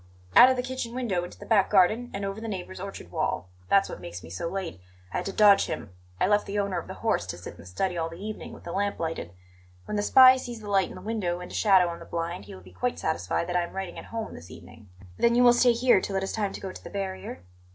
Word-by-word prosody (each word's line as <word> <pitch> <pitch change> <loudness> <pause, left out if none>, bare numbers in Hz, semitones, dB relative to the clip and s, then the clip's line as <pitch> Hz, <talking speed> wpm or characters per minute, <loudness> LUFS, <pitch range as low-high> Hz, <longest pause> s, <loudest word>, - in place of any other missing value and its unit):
"Out 255 - +10
of 260 - +1
the 250 - -1
kitchen 255 -2 -4
window 215 -9 -1
into 175 - -9
the - - -11
back 200 -4 +3
garden 215 +5 +3
and 200 0 -4
over 195 +2 -4
the 225 - -5
neighbour's 190 -3 -6
orchard 195 - -8
wall; 90 0 -2 0.2
that's 195 0 +4
what - - -8
makes 85 +1 -8
me 80 - -11
so 95 - -3
late; 180 - -5 0.3
I - - 0
had - - -3
to - - -2
dodge 200 -1 +5
him. 100 - -5 0.3
I - - +3
left 205 +2 +2
the 200 - -3
owner 200 -3 0
of - - -9
the - - -7
horse - - +1
to - - -5
sit 90 - -9
in - - -19
the - - -12
study 180 - -2
all 165 0 -1
the 165 - -9
evening 215 +4 -6
with 230 - -12
the 170 - -6
lamp 200 +2 -1
lighted. 160 - -3 0.5
When 210 - -3
the - - +1
spy 260 +4 +8
sees 240 -3 -6
the 205 -1 -7
light 195 -2 +3
in - - -10
the 185 - -9
window 190 -4 -2
and 180 - -9
a - - -9
shadow 190 -4 +5
on 170 0 -5
the 170 - -10
blind 165 -9 -4
he 100 -1 -10
will 95 - -13
be 90 -1 -15
quite 90 -2 -2
satisfied 90 - -1
that 180 - -3
I 180 - +3
am 170 - -5
writing 190 -2 -5
at - - -10
home 225 -1 -5
this 85 - -11
evening." 95 +5 -14 0.3
"Then 235 0 +4
you 245 - +5
will 240 -1 +8
stay 245 0 +5
here 235 -4 +4
till 195 - -4
it 190 - 0
is 195 - -3
time 205 -3 -1
to - - -6
go 190 - -5
to - - -12
the - - -8
barrier?" 190 - -5
195 Hz, 295 wpm, -27 LUFS, 170-215 Hz, 0.5 s, Out